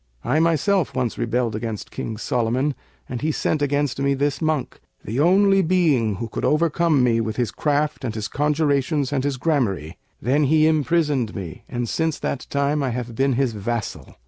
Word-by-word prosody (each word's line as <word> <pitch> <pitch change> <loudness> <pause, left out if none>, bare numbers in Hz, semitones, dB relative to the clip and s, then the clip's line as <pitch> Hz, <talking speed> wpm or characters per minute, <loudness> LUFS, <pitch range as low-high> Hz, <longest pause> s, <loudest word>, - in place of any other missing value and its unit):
I 135 +6 +1
myself 165 -1 +2
once 125 -3 -1
rebelled 120 -1 0
against 110 -1 -5
King 110 - -5
Solomon 125 +5 0 0.3
and 125 -2 -5
he 155 +2 +1
sent 155 0 -1
against 145 -2 0
me 140 0 +2
this 140 +1 -1
monk, 155 -4 -1 0.3
the 115 +6 -2
only 195 +4 +5
being 155 - +2
who 115 +4 -4
could - - -5
overcome 160 -2 +2
me 115 -2 +3
with 110 0 -3
his 120 -4 -1
craft 150 -1 0
and 115 -4 -3
his 105 -2 -3
conjurations 145 0 0
and 135 -2 0
his 140 -2 -1
gramarye; 120 - -1 0.2
then 140 +6 +2
he 155 +2 +4
imprisoned 150 -6 +1
me, 90 -6 -7
and 120 -1 -2
since 160 +4 -1
that 135 - -4
time 140 +1 0
I 135 - 0
have 120 -1 -4
been 135 +2 +2
his 125 -1 +1
vassal. 110 +1 -4
140 Hz, 180 wpm, -22 LUFS, 120-150 Hz, 0.3 s, only